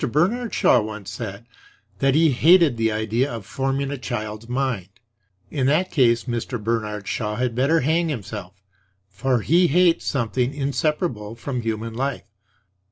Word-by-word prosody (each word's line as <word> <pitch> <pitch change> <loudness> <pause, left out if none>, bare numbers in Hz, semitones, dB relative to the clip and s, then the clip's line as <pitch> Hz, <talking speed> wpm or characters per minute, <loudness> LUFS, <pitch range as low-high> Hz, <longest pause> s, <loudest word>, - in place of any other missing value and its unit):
Bernard 215 - +1
Shaw 125 - +4
once 105 -2 -6
said 110 -1 -6 0.5
that 135 +1 +3
he 160 -1 +5
hated 160 +1 +5
the 115 -1 +1
idea 110 +5 0
of 115 -4 -6
forming 135 +3 -2
a 140 - -4
child's 110 -2 -5
mind. 125 -8 -1 0.6
In 130 -3 0
that 160 +6 +2
case 120 -6 +3
Mr. 120 0 -3
Bernard 105 -2 -2
Shaw 105 -2 -2
had 125 0 -1
better 140 +7 +2
hang 160 +4 +1
himself; 100 -6 -6 0.4
for 125 +4 0
he 175 - +4
hates 175 +1 +3
something 125 +1 -1
inseparable 140 - -1
from 125 +1 -4
human 115 0 -3
life. 125 -4 -3
125 Hz, 150 wpm, -23 LUFS, 110-140 Hz, 0.6 s, he